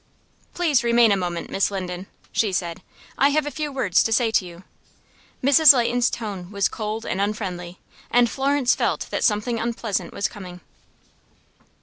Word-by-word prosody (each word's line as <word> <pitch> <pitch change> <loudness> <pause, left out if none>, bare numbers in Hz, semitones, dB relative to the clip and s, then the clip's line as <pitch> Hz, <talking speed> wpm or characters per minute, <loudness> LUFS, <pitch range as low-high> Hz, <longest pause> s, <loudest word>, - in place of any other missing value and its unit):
"Please 315 -8 +2
remain 235 -1 +4
a - - +4
moment, 175 -3 -4
Miss 195 - +1
Linden," 185 -1 -5 0.2
she 215 -3 0
said. 175 -2 -3 0.4
"I 275 - +5
have 300 +1 +1
a 295 - -4
few 300 -1 -4
words 250 -10 +2
to 225 - 0
say 225 0 +2
to 215 - +2
you." 175 0 -11 0.8
Mrs. 285 +1 +7
Leighton's 245 0 +2
tone 200 -6 -6
was 200 -1 0
cold 220 0 -5
and 190 - -2
unfriendly, 185 -4 -4 0.3
and 245 0 +4
Florence 270 0 +1
felt - - -1
that - - -2
something 220 +2 +1
unpleasant 220 -6 -3
was 200 - -1
coming. 180 -2 -10
215 Hz, 160 wpm, -23 LUFS, 185-245 Hz, 0.8 s, Mrs